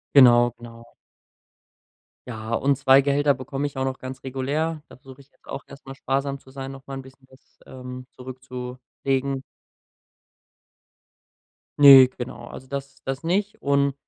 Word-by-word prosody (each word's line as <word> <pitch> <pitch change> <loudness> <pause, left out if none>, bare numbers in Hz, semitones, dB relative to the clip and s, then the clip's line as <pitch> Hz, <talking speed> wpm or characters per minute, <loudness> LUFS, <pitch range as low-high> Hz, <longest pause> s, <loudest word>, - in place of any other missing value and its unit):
Genau, 120 -2 +7
genau. 115 0 -13 1.3
Ja, 110 -1 -7
und 135 +3 +2
2 135 0 +5
Gehälter 140 +1 +2
bekomme 135 +2 -4
ich 140 -2 -7
auch 130 - 0
noch 130 0 -3
ganz 130 0 -8
regulär, 145 +4 -2
da - - -14
versuche 130 0 -15
ich 135 - -27
jetzt - - -33
auch 135 - -7
erst 140 0 -15
einmal 135 - -8
sparsam 135 +1 -2
zu 130 - -19
sein, 135 0 -7
nochmal 135 0 -8
'n - - -7
bisschen 130 0 -18
das, 130 0 -23
ähm, 125 0 -9
zurückzulegen. 130 +1 -5 2.4
Ne, 135 -3 +10
genau, 120 -1 -8
also 130 - -10
das 140 +1 -7
das 135 +1 -4
nicht. 195 +5 -1
Und 140 0 +2
135 Hz, 150 wpm, -24 LUFS, 130-140 Hz, 2.4 s, Ne